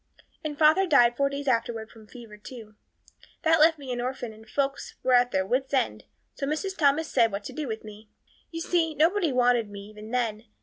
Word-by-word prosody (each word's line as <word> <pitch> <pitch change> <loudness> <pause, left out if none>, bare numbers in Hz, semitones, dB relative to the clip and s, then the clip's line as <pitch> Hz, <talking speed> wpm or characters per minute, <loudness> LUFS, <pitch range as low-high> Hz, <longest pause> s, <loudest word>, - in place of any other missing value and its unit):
And 300 -2 -4
father 315 +5 +4
died 240 -6 +5
four 280 +1 +1
days 280 0 -6
afterwards 230 -3 -1
from 220 -2 -16
fever 230 -3 -12
too. 215 0 -11 0.7
That 325 -1 +4
left 320 +1 +5
me 275 -3 -7
an 245 - -3
orphan 245 -2 -4
and 220 +1 -16
folks 275 +1 -2
were 255 - +2
at 245 0 +5
their 190 -5 0
wits' 265 +6 -1
end, 105 - -1 0.3
so 275 - -4
Mrs. 375 +6 -2
Thomas 300 0 +2
said, 230 -6 +2
what 200 +1 -4
to 260 - -8
do 295 +1 -4
with 220 -2 -5
me. 215 0 -12 0.4
You 330 0 -6
see, 330 -2 0
nobody 335 +2 +2
wanted 245 -3 +2
me 200 -1 -8
even 210 +1 -11
then. 230 -3 -2
250 Hz, 210 wpm, -26 LUFS, 220-300 Hz, 0.7 s, died